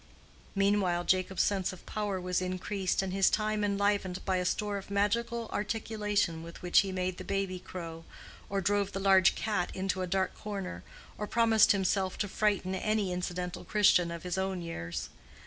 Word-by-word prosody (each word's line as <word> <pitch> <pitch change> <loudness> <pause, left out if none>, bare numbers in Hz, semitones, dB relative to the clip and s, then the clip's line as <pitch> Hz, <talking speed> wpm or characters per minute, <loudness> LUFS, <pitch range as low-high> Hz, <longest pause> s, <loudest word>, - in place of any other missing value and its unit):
Meanwhile 195 -3 +2
Jacob's 185 +1 +2
sense 195 -3 0
of 185 - -12
power 205 -3 -2
was 180 0 -1
increased 185 +1 -1
and 190 -1 -3
his 195 0 +4
time 215 -1 0
enlivened 200 -2 0
by 190 -1 +1
a 180 - -1
store 205 +2 -1
of 195 - -12
magical 230 +3 0
articulation 210 -5 -1
with 170 +2 -10
which 180 - +5
he 195 -1 +1
made 185 -1 -2
the - - -5
baby 195 -2 -2
crow, 165 -3 -7 0.5
or 195 0 0
drove 200 +1 +1
the 195 - -2
large 190 -1 +5
cat 210 -5 -1
into 190 0 -1
a 185 - -1
dark 190 +1 0
corner, 195 - -6 0.4
or 210 - -2
promised 225 -1 +5
himself 190 -1 +1
to 205 - -1
frighten 200 -2 0
any 205 0 0
incidental 180 0 -4
Christian 185 -4 +4
of 170 -1 -6
his 180 +1 -2
own 190 -2 -2
years. 85 - -5
190 Hz, 175 wpm, -31 LUFS, 180-205 Hz, 0.5 s, which